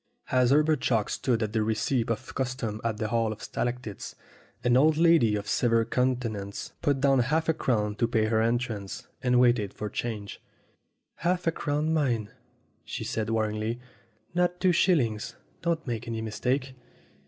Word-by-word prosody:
As 125 -1 +4
Herbert 150 +2 +3
Chalk 110 -4 +1
stood 120 -4 0
at 105 0 -3
the 110 - +2
receipt 110 +3 0
of 115 +3 -3
custom 125 -5 -3
at 115 -2 -1
the 110 0 -2
Hall 115 -1 +1
of 110 - -8
Stalactites, 120 -4 -4 0.5
an 120 0 +3
old 150 +4 +5
lady 165 -10 +5
of 105 0 -4
severe 115 -2 +2
counten 125 -2 0
ance 100 0 -6
put 140 -2 +1
down 135 -1 +4
half 155 +7 +1
a 160 - +4
crown 105 -8 0
to 115 - +2
pay 110 -2 +2
her 110 0 +2
entrance, 115 -4 -2
and 125 -1 +3
waited 120 -5 +3
for 105 -1 -5
change. 105 -4 -4 0.8
"Half 180 +1 0
a 165 - +3
crown, 155 0 -1
mind!" 120 -9 0 0.5
she - - -5
said 110 -1 -2
warningly. 110 +1 -1 0.5
"Not 180 0 +1
two 185 - +4
shillings. 130 - +1 0.3
Don't 165 -2 -1
make 120 -3 -4
any 115 -1 -3
mistake 125 +5 -1
120 Hz, 165 wpm, -28 LUFS, 110-135 Hz, 0.8 s, old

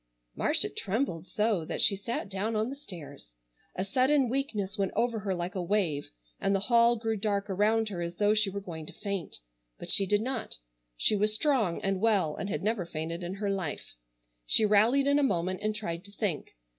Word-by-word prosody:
Marcia - - +2
trembled 190 - -2
so 210 -5 +1
that - - -4
she 200 - +5
sat 210 +3 -3
down 200 +3 -2
on 220 +4 0
the - - -5
stairs. 145 - -11 0.4
A 185 - -2
sudden 260 +4 +3
weakness 225 -7 -2
went 195 -2 0
over 235 -2 +1
her 195 -2 -2
like 175 +2 -3
a 190 - -2
wave, 175 -6 0 0.3
and 195 - +1
the - - +2
hall 235 +2 +5
grew 225 -1 -1
dark 200 -1 -1
around 215 +3 +2
her 180 -4 -4
as 170 0 -4
though 205 +3 +3
she 215 -2 +2
were 200 +1 -4
going 160 -5 -7
to - - -8
faint. 200 -5 -4 0.4
But - - -5
she 195 - +3
did 205 +2 +2
not. 255 -2 -3 0.4
She 215 - +3
was 210 +1 +2
strong 225 - +1
and 195 -1 0
well 200 -9 +2
and 200 - -4
had - - -2
never 215 -2 0
fainted 165 +2 -4
in 175 +2 -4
her 200 0 -1
life. 185 -7 -4 0.5
She 220 - +5
rallied 220 +7 +4
in 285 +1 +4
a - - +3
moment 185 -8 0
and 215 0 -1
tried 170 -5 -4
to 200 - -10
think. 200 - -3
205 Hz, 205 wpm, -29 LUFS, 185-225 Hz, 0.5 s, she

